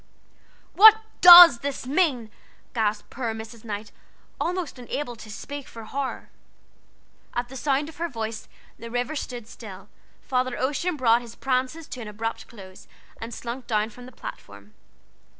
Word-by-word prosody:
"What 440 +1 +9 0.3
does 350 -7 +11
this 280 -1 -5
mean?" 265 - 0 0.4
gasped 215 -2 -2
poor 235 -3 -4
Mrs. 220 0 -10
Knight, 210 -1 -6 0.5
almost 350 -6 -3
unable 245 0 -5
to 215 - -12
speak 285 +6 -8
for 230 - -11
horror. 270 +4 -5 1.1
At 240 0 -2
the 265 - -10
sound 275 +2 0
of 315 -2 -12
her 340 +1 -3
voice 225 -4 -6 0.3
the 230 - -8
Rivers 245 +5 -2
stood 240 -3 -8
still, 200 -4 -11 0.3
Father 255 -1 -1
Ocean 300 +6 -1
brought 235 -2 +3
his 235 -1 -12
prances 260 +4 -2
to 255 - -7
an 220 - -7
abrupt 220 +2 -5
close, 190 -5 -14 0.3
and 225 +1 -6
slunk 240 +2 -7
down 215 0 0
from 245 +2 -13
the - - -12
platform. 100 - -11
245 Hz, 150 wpm, -24 LUFS, 220-280 Hz, 1.1 s, does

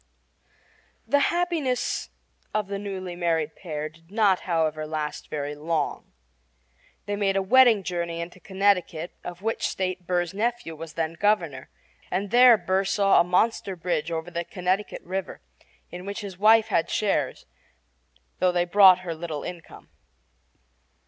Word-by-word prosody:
The 285 +6 +3
happiness 335 -8 -1 0.5
of 215 -1 +1
the 200 0 -3
newly 190 -3 -5
married 165 -3 -1
pair 155 -4 -5
did 165 +2 -19
not, 205 -3 +3
however, 155 -2 0
last 150 -1 -4
very 145 -1 -3
long. 155 0 -3 0.9
They 205 - -2
made 200 -1 0
a 195 - +2
wedding 235 -1 +5
journey 170 -2 -3
into 170 +2 -7
Connecticut, 190 -4 0
of 175 +2 -8
which 225 +1 -1
state 185 -1 -3
Burr's 175 -1 0
nephew 230 -4 -2
was 160 0 -9
then 165 -1 -1
Governor, 165 -8 0 0.4
and 195 +2 -2
there 245 -1 +8
Burr 190 -1 0
saw 195 0 +4
a - - +3
monster 190 +2 +1
bridge 170 -2 -2
over 165 +1 -4
the 170 0 -2
Connecticut 185 +3 -2
River, 190 +2 -5 0.5
in 180 +2 -8
which 200 +3 -4
his 200 -3 -7
wife 220 +1 +5
had 165 - +1
shares, 170 -11 -1 0.9
though 185 - +3
they 175 0 +1
brought 185 0 +7
her 175 -2 -4
little 160 -2 -5
income. 175 -2 -9
180 Hz, 145 wpm, -25 LUFS, 165-205 Hz, 0.9 s, there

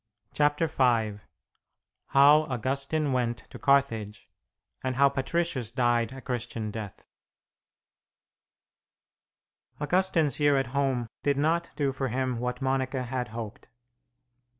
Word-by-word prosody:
CHAPTER 150 +2 +2
V 115 -8 +1 0.9
HOW 145 +3 +6
AUGUSTINE 135 +4 -1
WENT 120 -2 -1
TO - - -9
CARTHAGE, 115 -7 +1 0.6
AND 130 -1 -1
HOW 140 +1 +5
PATRICIUS 135 -3 -1
DIED 120 -2 +1
A 135 - -9
CHRISTIAN 120 -4 -4
DEATH 105 -2 -8 2.7
Augustine's 165 -2 +1
year 145 -1 +4
at 135 -2 -2
home 135 -4 0 0.2
did 140 -1 +1
not 165 +4 +1
do 145 -2 0
for 135 0 -3
him 130 0 -1
what 125 +1 -3
Monica 130 0 0
had 125 0 -3
hoped. 110 -1 -8
130 Hz, 110 wpm, -28 LUFS, 120-145 Hz, 2.7 s, HOW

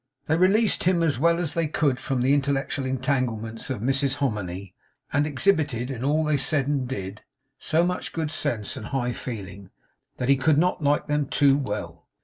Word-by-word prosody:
They 160 - +2
released 195 +5 +3
him 175 -2 +3
as 145 -6 +1
well 170 +3 +3
as 170 -4 -2
they 165 -2 0
could 145 -4 0
from 130 -1 -2
the 130 +3 +3
intellectual 140 0 0
entanglements 125 -4 -2
of 130 -6 -3
Mrs 135 +2 +1
Hominy; 100 -7 -3 0.4
and 145 +1 +2
exhibited, 145 - +1
in 125 -2 -5
all 150 +3 +2
they 150 -1 +1
said 135 +1 +1
and 140 -3 -1
did, 100 -4 -5 0.4
so 165 +2 +2
much 180 0 -3
good 160 -2 -3
sense 110 -8 -2
and 110 -5 -7
high 125 -3 -1
feeling, 100 -6 -7 0.5
that 125 - -2
he 140 0 +5
could 145 +2 +3
not 180 +1 +2
like 145 0 +2
them 150 -2 0
too 140 0 +4
well. 105 -7 -4
140 Hz, 185 wpm, -25 LUFS, 125-155 Hz, 0.5 s, he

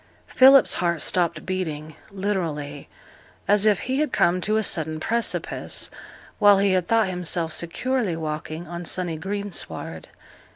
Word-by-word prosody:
Philip's 270 +1 +6
heart 170 -2 0
stopped 170 -1 0
beating; 155 -5 -4 0.2
literally, 165 -8 -3 0.6
as 205 +1 +4
if 210 -3 +3
he 260 +2 -2
had 305 -3 0
come 175 +1 +2
to 215 +3 +1
a 220 - +1
sudden 160 -4 -1
precipice, 230 +7 -2 0.5
while 205 -1 +7
he 200 0 +2
had 185 -2 +1
thought 225 -3 +3
himself 175 -3 -2
securely 195 +5 -1
walking 155 +1 -5
on 175 +1 -6
sunny 175 -1 -2
greensward. 195 - -4
180 Hz, 135 wpm, -24 LUFS, 160-205 Hz, 0.6 s, while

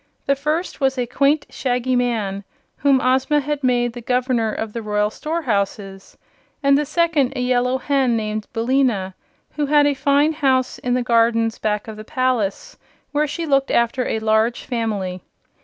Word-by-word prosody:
The 280 - +2
first 305 +6 -2
was 265 0 +1
a 250 - 0
quaint 280 +4 +1
Shaggy 250 0 -1
Man, 220 -5 -1 0.3
whom 275 -2 +3
Ozma 260 +4 +2
had 290 0 -3
made 240 -2 +1
the 240 - -8
Governor 250 -2 0
of 220 0 -5
the 230 - -4
Royal 210 -1 0
Storehouses, 205 - -3 0.5
and 280 0 +5
the 295 0 0
second 305 -4 +1
a - - -3
Yellow 250 +1 +1
Hen 265 -3 +1
named 215 -1 -3
Billina, 230 -5 0 0.4
who 295 -1 0
had 295 0 +4
a 290 - +3
fine 285 +3 +2
house 265 -4 +1
in 245 0 -1
the 250 - 0
gardens 230 -1 +2
back 210 0 -1
of 220 -1 -8
the 215 - -8
palace, 245 -4 -1 0.3
where 300 +1 +1
she 335 +3 -4
looked 275 -2 +2
after 235 +2 +1
a - - -1
large 220 +2 +1
family. 205 -7 -3
250 Hz, 170 wpm, -20 LUFS, 220-275 Hz, 0.5 s, and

